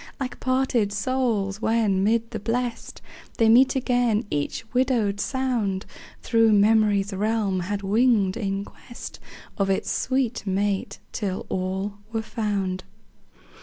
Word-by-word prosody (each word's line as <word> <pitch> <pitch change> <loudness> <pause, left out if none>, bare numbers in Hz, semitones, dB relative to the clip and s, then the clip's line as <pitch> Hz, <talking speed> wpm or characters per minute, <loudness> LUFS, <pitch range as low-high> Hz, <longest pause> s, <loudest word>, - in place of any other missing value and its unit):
Like 255 -2 -4
parted 255 -5 +1
souls, 215 -3 -1
when, 220 -5 +2
mid 230 +2 +1
the 225 - -4
Blest 240 +2 -3 0.3
They 225 -1 +4
meet 255 +5 +6
again, 245 -3 +1
each 145 +9 -2
widowed 240 -6 +1
sound 235 -8 -1 0.4
Thro' 225 -1 +4
memory's 210 -1 +3
realm 205 -1 0
had 200 +3 -3
winged 210 -2 +3
in 200 -3 -2
quest 240 - -10 0.4
Of 195 -1 +1
its 190 - 0
sweet 255 -5 -1
mate, 195 0 -1
till 195 -4 -3
all 190 +2 -3
were 225 -1 -2
found. 200 -5 -2
215 Hz, 125 wpm, -24 LUFS, 195-240 Hz, 0.4 s, meet